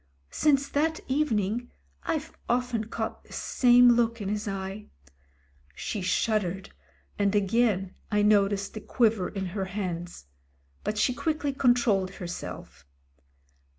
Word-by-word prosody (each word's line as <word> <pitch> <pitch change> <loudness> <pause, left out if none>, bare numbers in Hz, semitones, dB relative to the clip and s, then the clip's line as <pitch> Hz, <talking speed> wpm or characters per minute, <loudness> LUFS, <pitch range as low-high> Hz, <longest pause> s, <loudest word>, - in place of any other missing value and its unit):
Since 280 -2 +2
that 315 +3 0
evening 240 -5 0 0.3
I've 315 -1 -3
often 245 -2 0
caught 220 - -4
the - - -15
same 245 -1 +5
look 230 -1 +2
in 200 -2 -3
his 210 +1 -2
eye." 195 +1 -5 0.9
She 210 - -4
shuddered, 190 0 0 0.5
and 200 0 +2
again 200 -2 +2 0.2
I 210 -1 +2
noticed 200 -1 +3
the 215 - -6
quiver 220 -7 +1
in 195 -2 -4
her 195 -2 -2
hands, 180 - -5 0.6
but 215 - -2
she 250 +4 +2
quickly 300 0 -1
controlled 235 -8 +2
herself. 175 - -7
210 Hz, 120 wpm, -27 LUFS, 195-245 Hz, 0.9 s, same